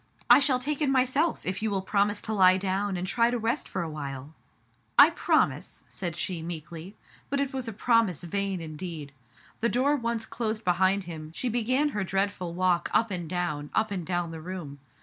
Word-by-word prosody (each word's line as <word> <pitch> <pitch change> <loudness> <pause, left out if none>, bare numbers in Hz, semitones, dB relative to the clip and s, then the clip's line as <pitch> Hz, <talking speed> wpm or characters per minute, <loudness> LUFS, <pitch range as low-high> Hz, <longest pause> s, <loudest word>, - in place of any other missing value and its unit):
I - - +10
shall 275 -2 +3
take 285 +4 -2
it 290 - +2
myself, 270 +5 +1
if 185 +2 -2
you 220 - 0
will 195 -2 -1
promise 205 +1 +1
to 220 - -2
lie 185 -2 +6
down 195 0 -1
and 180 - -3
try 230 +5 +2
to 245 - 0
rest 230 +5 -1
for 190 - -2
awhile. 145 -2 -6 0.3
" - - -41 0.3
I - - +9
promise, - - 0
said 175 -4 -3
she 175 -1 -2
meekly, 165 +3 -7 0.3
but 280 - 0
it 280 0 -1
was 260 -2 -2
a - - -3
promise 225 - +2
vain 195 +1 -2
indeed. 155 -2 -7 0.5
The 235 - +1
door 260 +6 +2
once 235 -4 -2
closed 220 -2 -3
be 180 - +4
hind 190 +2 +2
him, 160 -3 -8
she 250 - -1
began 255 +6 +1
her 210 -7 -2
dreadful 190 -2 -2
walk 180 -1 +1
up 225 -2 +3
and 175 -4 -4
down, 155 -5 -2
up 220 -1 +1
and 185 -3 -2
down 175 -1 -2
the 160 -1 -7
room. 160 -5 -7
195 Hz, 205 wpm, -27 LUFS, 175-230 Hz, 0.5 s, I